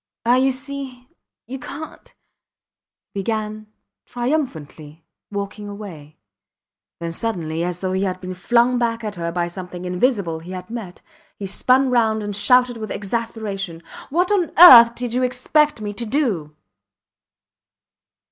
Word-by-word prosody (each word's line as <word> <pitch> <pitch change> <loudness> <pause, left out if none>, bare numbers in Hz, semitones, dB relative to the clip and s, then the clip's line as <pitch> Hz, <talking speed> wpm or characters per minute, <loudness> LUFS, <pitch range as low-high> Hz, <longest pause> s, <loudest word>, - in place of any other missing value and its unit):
Ah! 245 +2 +4
You 265 +1 +3
see... 265 -1 -5 0.4
you 265 +2 -7
cant... 310 +5 -9 1.0
he 200 - -3
began, 215 +1 -3 0.4
triumphantly, 165 - -4 0.3
walking 205 +1 -5
away; 165 -8 -10 0.8
then 170 0 -4
suddenly, 165 -5 -3
as 180 0 -4
though 185 -1 -1
he 190 - 0
had 185 -2 -2
been 185 0 -6
flung 240 +6 +2
back 230 -1 -1
at 210 -1 -4
her 170 -2 -4
by 175 0 -1
something 180 0 -8
invisible 180 -3 0
he 175 +3 -9
had 185 +4 -8
met, 220 -7 -7 0.4
he 200 - -6
spun 255 +7 +2
round 220 -3 +2
and 205 -1 -4
shouted 250 +4 +3
with 215 -2 -6
exasperation: 200 -5 -4 0.3
What 355 +7 +1
on 375 -5 +1
earth 235 -9 +10
did 245 -1 -4
you 250 - +1
expect 255 +2 +1
me 205 -1 -4
to 235 +3 -5
do? 210 - -1
215 Hz, 140 wpm, -21 LUFS, 180-250 Hz, 1.0 s, earth